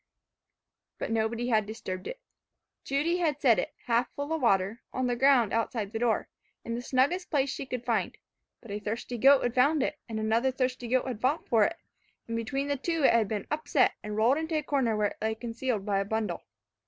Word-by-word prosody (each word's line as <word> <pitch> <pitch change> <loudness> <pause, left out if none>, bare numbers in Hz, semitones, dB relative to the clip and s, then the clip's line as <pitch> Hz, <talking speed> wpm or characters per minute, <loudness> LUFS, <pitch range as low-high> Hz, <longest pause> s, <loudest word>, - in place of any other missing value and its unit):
But - - -4
nobody 225 +2 0
had 215 -3 +2
disturbed 190 -4 -6
it. - - -6 0.6
Judy 300 +6 0
had 310 -5 0
set 245 -6 +4
it, - - -4
half 240 +1 +1
full 285 +2 -3
of 320 - -2
water, 200 -1 +2
on 255 - -1
the 245 -1 0
ground 250 -3 +4
outside 225 -2 -1
the 225 - -2
door, 235 -2 +1 0.4
in 230 - -3
the 235 - -3
snuggest 275 +9 +1
place 280 -3 +1
she 270 - -5
could 250 -2 -5
find; - - 0 0.4
but 230 - -11
a 205 - -3
thirsty 225 +3 -4
goat 275 +3 +6
had 245 - 0
found 280 +3 +3
it, 300 - -3
and 220 -1 -3
another 225 +4 +2
thirsty 255 -1 -2
goat 255 +2 +1
had 240 -4 -5
fought 280 +6 0
for 220 -3 +4
it, 335 - -2 0.5
and 230 - -3
between 270 +5 -2
the 285 0 0
two, 330 +2 -1
it - - +6
had 230 -3 +3
been 205 -1 -3
upset, 300 -3 +2
and 210 0 -5
rolled 240 +7 +3
into 320 0 -3
a 305 - -1
corner 260 -7 +1
where 210 -1 +2
it - - -13
lay 220 0 0
concealed 230 -2 -3
by 200 -2 +1
a 195 - -1
bundle. 210 -4 -2
245 Hz, 215 wpm, -29 LUFS, 220-275 Hz, 0.6 s, goat